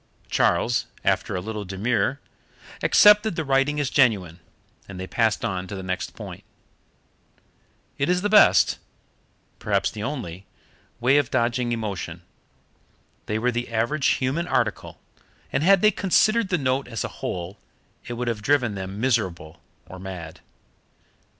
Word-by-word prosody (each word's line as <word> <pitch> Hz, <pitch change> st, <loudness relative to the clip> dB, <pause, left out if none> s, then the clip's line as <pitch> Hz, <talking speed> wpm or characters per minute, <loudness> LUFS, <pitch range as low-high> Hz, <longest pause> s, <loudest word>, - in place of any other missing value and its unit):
Charles, 120 Hz, +1 st, +1 dB, 0.2 s
after -, -, 0 dB
a 90 Hz, -, -2 dB
little 105 Hz, +1 st, -5 dB
demur, 110 Hz, +8 st, -1 dB, 0.6 s
accepted 210 Hz, -1 st, +5 dB
the 160 Hz, -, -2 dB
writing 135 Hz, +2 st, +1 dB
as 145 Hz, -2 st, -1 dB
genuine, 100 Hz, -, +2 dB, 0.5 s
and 95 Hz, -2 st, -8 dB
they 95 Hz, -, -4 dB
passed 110 Hz, +3 st, 0 dB
on 95 Hz, -1 st, -3 dB
to 100 Hz, -, -6 dB
the 95 Hz, -, -6 dB
next 90 Hz, -1 st, -4 dB
point. -, -, -9 dB, 1.6 s
It 140 Hz, -, +1 dB
is 180 Hz, +1 st, +1 dB
the -, -, +2 dB
best 210 Hz, 0 st, +5 dB, 0.8 s
perhaps 100 Hz, -2 st, 0 dB
the 105 Hz, -, -7 dB
only 100 Hz, -, -5 dB, 0.5 s
way 130 Hz, +4 st, +4 dB
of 145 Hz, -4 st, +1 dB
dodging 120 Hz, 0 st, 0 dB
emotion. 100 Hz, -7 st, -4 dB, 1.0 s
They 105 Hz, -, -1 dB
were 125 Hz, +3 st, +1 dB
the 120 Hz, 0 st, -3 dB
average 120 Hz, +6 st, 0 dB
human 140 Hz, +7 st, -1 dB
article, -, -, -1 dB, 0.5 s
and -, -, +1 dB
had 190 Hz, +3 st, +5 dB
they 215 Hz, -, +6 dB
considered 215 Hz, +2 st, +2 dB
the 180 Hz, -, +1 dB
note 135 Hz, -1 st, -1 dB
as 115 Hz, -2 st, -4 dB
a -, -, -2 dB
whole 90 Hz, +2 st, -5 dB, 0.5 s
it 120 Hz, -, -4 dB
would 120 Hz, +1 st, -4 dB
have 115 Hz, -3 st, -2 dB
driven 125 Hz, -2 st, +1 dB
them 95 Hz, +1 st, -6 dB
miserable 95 Hz, -11 st, -1 dB, 0.2 s
or 95 Hz, +2 st, -11 dB
mad. 90 Hz, -4 st, -8 dB
115 Hz, 145 wpm, -24 LUFS, 95-140 Hz, 1.6 s, they